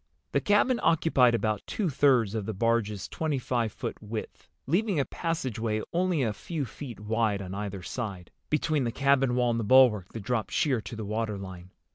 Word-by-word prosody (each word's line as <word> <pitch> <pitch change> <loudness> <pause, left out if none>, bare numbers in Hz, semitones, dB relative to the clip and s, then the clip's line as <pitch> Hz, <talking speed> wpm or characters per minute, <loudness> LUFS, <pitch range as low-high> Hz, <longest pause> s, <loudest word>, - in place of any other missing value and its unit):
The - - +1
cabin 220 +5 +3
occupied 150 -7 +4
about 110 -3 0
two 210 - -1
thirds 130 -7 +3
of 110 -3 -3
the 110 - -3
barge's 110 -2 0
twenty 155 -3 -2
five 120 -3 -1
foot - - -6
width, 110 +1 -7 0.2
leaving 185 +4 +1
a 135 - +1
passageway 115 - -2
only 175 -4 +1
a 110 -3 0
few 155 - -4
feet 125 -3 -9
wide 110 -1 0
on 95 -1 -6
either 100 -2 -5
side, 100 -5 -5 0.2
between 155 -1 +1
the 120 - -1
cabin 135 -1 +2
wall 125 -1 +2
and 115 - 0
the - - -1
bulwark 110 -5 +5
that 115 - -5
dropped 110 0 -1
sheer 130 -7 +1
to 115 - -8
the 110 -1 -5
water 110 0 -2
line. 95 -2 -9
115 Hz, 190 wpm, -28 LUFS, 105-140 Hz, 0.2 s, bulwark